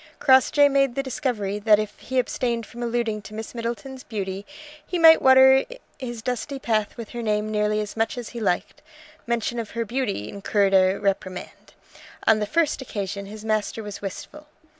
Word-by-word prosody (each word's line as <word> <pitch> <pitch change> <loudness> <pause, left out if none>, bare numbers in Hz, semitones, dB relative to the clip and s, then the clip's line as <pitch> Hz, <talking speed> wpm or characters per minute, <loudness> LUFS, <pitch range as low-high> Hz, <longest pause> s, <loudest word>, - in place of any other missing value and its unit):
Crossjay 270 +2 +5
made 275 -3 +2
the 275 - -1
discovery 225 -6 -2
that 210 0 +5
if 210 0 -4
he 260 - -4
abstained 240 -2 -1
from 240 - -10
alluding 235 -2 -1
to 215 +1 -11
Miss 220 0 -6
Middleton's 240 +3 -5
beauty 195 -2 -5 0.4
he 360 - -3
might 325 -1 +8
water 265 0 +7 0.4
his 240 -4 -6
dusty 250 +3 -3
path 220 -4 -1
with 230 -2 -7
her 240 - -6
name 215 -1 -1
nearly 210 0 +1
as 210 - -6
much 225 +2 -1
as 240 -2 -5
he 235 - -7
liked. 195 -5 -1 0.5
Mention 235 0 -1
of 225 - -5
her 230 - 0
beauty 215 - -2
incurred 200 - 0
a 190 0 +5
reprimand. 190 -2 -4 0.5
On 220 -1 +5
the 210 - -2
first 310 +2 +1
occasion 200 -4 -5
his 215 +1 -10
master 215 0 -1
was 205 -1 -7
wistful. 300 +9 -8
225 Hz, 180 wpm, -24 LUFS, 210-255 Hz, 0.5 s, might